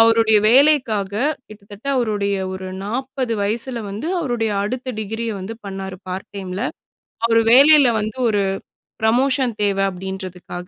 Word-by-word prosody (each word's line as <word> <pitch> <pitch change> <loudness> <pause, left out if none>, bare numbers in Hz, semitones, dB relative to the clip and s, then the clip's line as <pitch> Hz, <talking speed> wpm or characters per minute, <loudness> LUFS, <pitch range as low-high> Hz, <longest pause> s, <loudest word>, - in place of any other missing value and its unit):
அவருடைய 225 -1 +5
வேலைக்காக, 250 -7 +3 0.4
கிட்டத்தட்ட 205 +3 -13
அவருடைய 205 -4 0 0.2
ஒரு 190 0 -6 0.2
40 255 +2 -3
வயசுல 235 +4 -2
வந்து 210 +10 -5
அவருடைய 240 -8 -1
அடுத்த 255 +4 -3
டிகிரி 225 +2 -4
ய 220 - -2
வந்து 195 +5 -6
பண்ணாரு, 190 -1 -6
பார்ட் 185 +2 -5
டைம் 190 -2 -6
ல. - - -1 0.6
அவரு 230 0 +4
வேலையில 280 +1 +7
வந்து 215 +3 -4
ஒரு 205 -2 +1 0.6
புரமோஷன் 255 +2 +2
தேவ 200 -1 +1
அப்பிடின்றதுக்காக. 185 -1 -7
220 Hz, 135 wpm, -20 LUFS, 200-250 Hz, 0.6 s, வேலையில